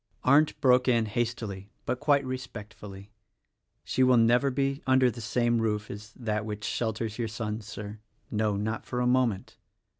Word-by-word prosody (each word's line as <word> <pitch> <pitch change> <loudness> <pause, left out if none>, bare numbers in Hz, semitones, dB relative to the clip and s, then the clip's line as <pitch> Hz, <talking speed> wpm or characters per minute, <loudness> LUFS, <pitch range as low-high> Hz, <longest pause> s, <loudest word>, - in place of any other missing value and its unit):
Arndt 150 +4 +4
broke 125 -1 +4
in 115 -3 +3
hastily 110 -3 -3 0.2
but 125 +1 -1
quite 145 -2 +3
respectfully, 105 -5 -8 0.7
"She 130 - -1
will 130 -1 +6
never 120 +4 +4
be 135 +2 -1
under 130 -1 +4
the 120 - -9
same 120 +1 +1
roof 105 -1 -1
as 105 +2 -9
that 110 -3 -2
which 105 -1 -6
shelters 110 0 -2
your 115 - 0
son, 110 0 -4
Sir 105 0 -8 0.2
— - - -37
no: 105 -2 +1
not 110 +2 -2
for 125 - -4
a 125 - +1
moment. 125 -5 +1
115 Hz, 170 wpm, -28 LUFS, 105-125 Hz, 0.7 s, will